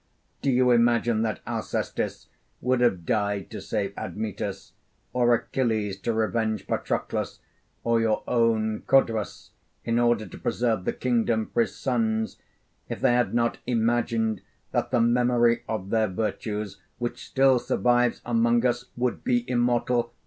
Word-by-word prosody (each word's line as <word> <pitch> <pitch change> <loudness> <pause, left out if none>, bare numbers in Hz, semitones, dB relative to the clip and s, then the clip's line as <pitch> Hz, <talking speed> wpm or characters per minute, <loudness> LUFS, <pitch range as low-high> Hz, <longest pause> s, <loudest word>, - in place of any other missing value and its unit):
Do 140 - +1
you 125 -1 +4
imagine 120 -1 +3
that 110 -2 -2
Alcestis - - -3 0.3
would 125 0 +1
have 95 -9 +2
died 100 -2 -1
to - - -6
save - - -2
Admetus, 105 -2 -5 0.4
or 120 -1 +3
Achilles 110 -6 -1
to 110 +2 -1
avenge 110 0 -1
Patroclus, - - -2 0.4
or 115 -1 +2
your 110 -1 +1
own 110 -2 +1
Codrus 115 -6 +1 0.3
in 115 +1 +1
order 120 -2 +2
to 95 - -11
preserve 115 -5 0
the - - 0
kingdom 115 -3 0
for - - +3
his - - -2
sons, 110 -4 -1 0.5
if - - -4
they - - +3
had 120 -1 +1
not 115 0 +1
imagined 115 -3 +1 0.3
that 120 - 0
the 120 -1 +2
memory 120 0 +3
of 100 -3 -3
their 110 -1 +3
virtues, 105 0 -3 0.2
which 120 0 -4
still 135 -1 +4
survives 120 0 +1
among 120 +1 +2
us, 120 0 0
would 125 0 -1
be 120 -1 +1
immortal? 120 -1 +1
115 Hz, 140 wpm, -26 LUFS, 110-120 Hz, 0.5 s, you